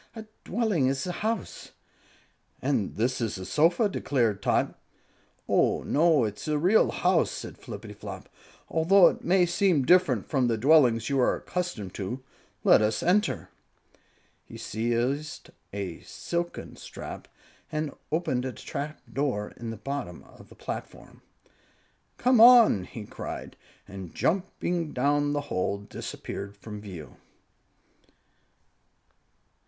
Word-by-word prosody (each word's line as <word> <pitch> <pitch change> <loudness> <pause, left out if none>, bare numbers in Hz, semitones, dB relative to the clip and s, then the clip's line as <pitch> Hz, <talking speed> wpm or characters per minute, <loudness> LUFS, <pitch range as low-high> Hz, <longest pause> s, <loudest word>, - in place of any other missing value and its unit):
"A 220 -1 -7 0.2
dwelling 205 - +1
is 135 0 -1
a 180 - -2
house." 220 +3 -4 0.9
"And 130 -8 -1
this 120 +3 0
is 110 -3 -2
a 95 - -7
sofa!" 170 - +3
declared 120 - 0
Tot. - - +1 0.7
"Oh, - - +2
no; 155 -3 +3
it's 105 +5 -5
a 150 -1 +1
real 185 +8 +4
house," - - +2
said - - -7
Flippityflop, - - -8 0.4
"although 175 +3 +5
it - - -7
may 180 0 +4
be 185 +2 +2
different 180 +5 +3
from 130 -5 +1
the 115 -2 +1
dwellings 125 -3 +4
you 140 -1 +1
are 125 - +3
accustomed 170 - -4
to. 115 +7 -5 0.4
Let - - +6
us 105 0 0
enter." 205 +4 +1 0.9
He - - -11
seized 120 +7 -2 0.2
a 95 -4 -5
silken 175 0 -5
strap - - -8 0.4
and 155 -1 -2 0.2
opened 150 -6 0
a 130 -1 -4
trap 145 +7 -6
door 125 -6 -1
in 115 -1 -6
the 115 - -5
top 140 -1 -4
of 90 - -14
the - - -15
platform. - - -8 1.0
"Come 250 -2 +4
on!" 230 - +8
he 110 +1 -8
cried, - - -7 0.3
and 95 -3 -9
jumping 175 -2 -1
down 145 +2 +1
the 145 - 0
hole, 100 -7 -2
disappeared 100 0 -7
from 105 0 -8
view. 90 -7 -10
140 Hz, 125 wpm, -27 LUFS, 110-175 Hz, 1.0 s, on